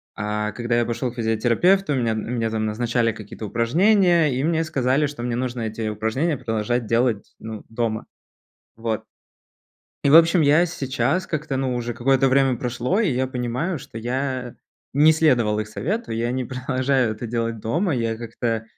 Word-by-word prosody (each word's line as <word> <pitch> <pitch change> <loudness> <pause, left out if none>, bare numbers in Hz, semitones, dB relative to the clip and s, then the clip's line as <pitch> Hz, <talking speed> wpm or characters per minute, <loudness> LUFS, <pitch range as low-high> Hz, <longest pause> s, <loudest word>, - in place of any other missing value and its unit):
а 105 0 -2
когда 120 +1 -1
я 120 - +2
пошел 120 +1 -2
к - - -16
физиотерапевту, 120 - +2
мне 115 -3 +1
мне 115 +1 -2
там 110 -1 -1
назначали 115 +2 0
какие-то 110 0 -8
упражнения, 170 - +3
и 130 - -1
мне 165 +1 +1
сказали, 140 -2 +1
что 140 -4 -7
мне 120 -1 -1
нужно 125 -1 -3
эти 110 0 -3
упражнения 110 +9 -1
продолжать 110 +2 -1
делать, 115 -1 0
ну, 110 -1 -7
дома. 115 -1 -2 0.7
Вот. 115 -1 -3 1.0
И, 140 - +4
в 155 - +9
общем, 165 0 +6
я 150 +4 +5
сейчас 135 +2 -1
как-то, 150 -3 -3
ну, 130 -1 -1
уже 120 0 -3
какое-то 135 +3 +2
время 135 -1 +3
прошло, 125 - -1
и 205 -9 +2
я 130 +1 0
понимаю, 125 +7 -2
что 115 - -9
я 125 +1 -3 0.4
не 150 +3 +6
следовал 125 -10 +2
их 105 - -2
совету, 200 - -3
я 115 +1 -1
не 130 +1 -2
продолжаю 130 -1 0
это 110 +3 -6
делать 115 0 -2
дома, 160 - 0
я 115 -2 -1
как-то 115 -1 -3
125 Hz, 170 wpm, -23 LUFS, 115-140 Hz, 1.0 s, в